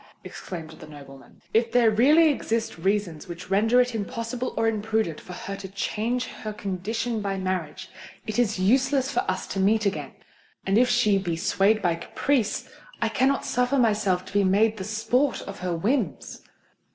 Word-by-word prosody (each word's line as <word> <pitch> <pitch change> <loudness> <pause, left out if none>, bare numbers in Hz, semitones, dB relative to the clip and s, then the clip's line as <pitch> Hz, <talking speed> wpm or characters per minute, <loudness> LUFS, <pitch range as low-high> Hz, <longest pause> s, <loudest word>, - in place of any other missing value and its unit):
exclaimed 165 -4 -8
the 160 - -12
nobleman. 140 -2 -14
"If 230 +1 +2
there 235 -2 +4
really 295 +9 +5
exist 225 - -2
reasons 190 -2 -1
which 175 +2 -9
render 225 +5 +4
it 250 0 +2
impossible 230 +3 -3
or 225 - +2
imprudent 220 -6 -1
for 180 - -10
her 195 +2 -6
to 195 -1 -7
change 220 +5 -2
her 215 -3 -7
condition 215 +4 -3
by 195 -1 -2
marriage, 185 -5 -3 0.4
it 215 +1 -2
is 220 -4 +1
useless 265 +7 +2
for - - 0
us 185 0 -2
to 195 - -4
meet 215 +3 +3
again:—and 195 +1 -3
if 250 0 +4
she 215 -5 +3
be 175 -3 -2
swayed 200 +6 +2
by 175 -2 +3
caprice, 215 +7 -1 0.3
I 230 - +1
cannot 265 +5 +1
suffer 250 +3 +1
myself 205 -6 +2
to - - -12
be 205 0 +3
made 210 +4 +3
the 190 - -5
sport 240 +6 0
of 195 - -8
her 180 -2 -2
whims." 215 - -2
210 Hz, 170 wpm, -25 LUFS, 190-235 Hz, 0.4 s, really